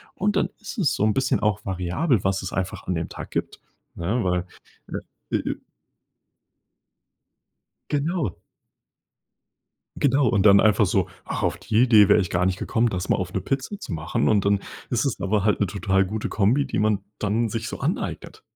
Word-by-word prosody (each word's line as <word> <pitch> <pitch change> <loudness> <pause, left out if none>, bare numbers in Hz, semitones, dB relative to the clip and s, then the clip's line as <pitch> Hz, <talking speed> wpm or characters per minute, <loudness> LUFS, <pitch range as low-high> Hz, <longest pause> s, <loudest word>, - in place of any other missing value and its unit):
Und 205 +1 0
dann - - +2
ist 220 - -8
es 175 - +2
so - - -1
'n 110 0 +3
bisschen 130 -3 +1
auch 105 -1 0
variabel, 95 - 0
was 95 0 0
es 95 - -5
einfach 95 +1 -3
an 90 - 0
dem 80 0 -3
Tag - - -8
gibt, - - -3 0.4
ne, 105 +8 -1
weil 90 -1 0 0.8
äh, - - 0
äh - - -3 2.4
Genau. 150 - -1 1.6
Genau. 140 -1 +3
Und 105 -3 +2
dann 100 -1 +8
einfach 105 0 +4
so: 95 -1 +1 0.2
„Ach, - - -4
auf - - 0
die 110 +2 +2
Idee 110 -5 +6
wär 105 - +7
ich 90 -4 -1
gar 90 0 +1
nicht 95 0 0
gekommen, 115 +1 +1
das 95 -2 -3
mal - - +3
auf 90 -1 -4
'ne - - 0
Pizza 135 - -3
zu - - -6
machen." 80 0 -1
Und 105 -3 +3
dann 100 0 +3 0.3
ist 120 +2 0
es 135 - -2
aber 100 0 +1
halt 105 -1 +2
'ne 100 - +3
total 95 0 +1
gute 110 +3 -3
Kombi, 115 +8 +2
die - - -2
man 105 -2 +1
dann 110 +3 0
sich 110 +1 -4
so - - -6
aneignet. - - -3
105 Hz, 190 wpm, -24 LUFS, 95-120 Hz, 2.4 s, dann